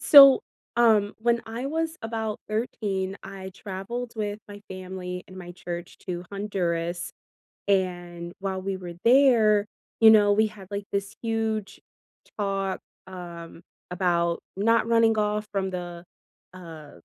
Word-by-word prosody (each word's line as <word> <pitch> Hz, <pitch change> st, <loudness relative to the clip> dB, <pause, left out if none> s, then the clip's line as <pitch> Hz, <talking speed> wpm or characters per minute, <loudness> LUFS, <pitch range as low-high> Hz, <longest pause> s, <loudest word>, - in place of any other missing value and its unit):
So, 275 Hz, 0 st, +10 dB, 0.4 s
um, 220 Hz, -4 st, +4 dB
when 235 Hz, +1 st, +2 dB
I 230 Hz, +3 st, -5 dB
was 325 Hz, +2 st, -1 dB
about 220 Hz, -1 st, -3 dB
13, 200 Hz, -3 st, -2 dB
I 190 Hz, -1 st, -8 dB
traveled 215 Hz, +5 st, -5 dB
with 210 Hz, -1 st, -3 dB
my 205 Hz, 0 st, -10 dB
family 185 Hz, -1 st, -6 dB
and 185 Hz, -, -13 dB
my 175 Hz, -1 st, -8 dB
church 175 Hz, 0 st, -7 dB
to 175 Hz, -1 st, -4 dB
Honduras, 175 Hz, -4 st, -2 dB, 0.6 s
and 175 Hz, -3 st, -1 dB
while 190 Hz, -1 st, -3 dB
we 195 Hz, 0 st, -2 dB
were 175 Hz, -2 st, -7 dB
there, 230 Hz, -5 st, +6 dB, 0.4 s
you 225 Hz, -, +10 dB
know, 205 Hz, -2 st, +6 dB
we 215 Hz, +1 st, +3 dB
had, 205 Hz, -3 st, -12 dB
like, 200 Hz, 0 st, -3 dB
this 200 Hz, 0 st, -2 dB
huge 225 Hz, -2 st, -2 dB, 0.6 s
talk, 195 Hz, -2 st, -1 dB, 0.3 s
um, 170 Hz, -3 st, -9 dB, 0.3 s
about 170 Hz, -2 st, +1 dB, 0.2 s
not 230 Hz, +3 st, +3 dB
running 230 Hz, -1 st, +4 dB
off 210 Hz, 0 st, 0 dB
from 195 Hz, -1 st, 0 dB
the, 175 Hz, -1 st, -6 dB, 0.5 s
uh 165 Hz, -5 st, -10 dB
195 Hz, 135 wpm, -26 LUFS, 180-220 Hz, 0.6 s, So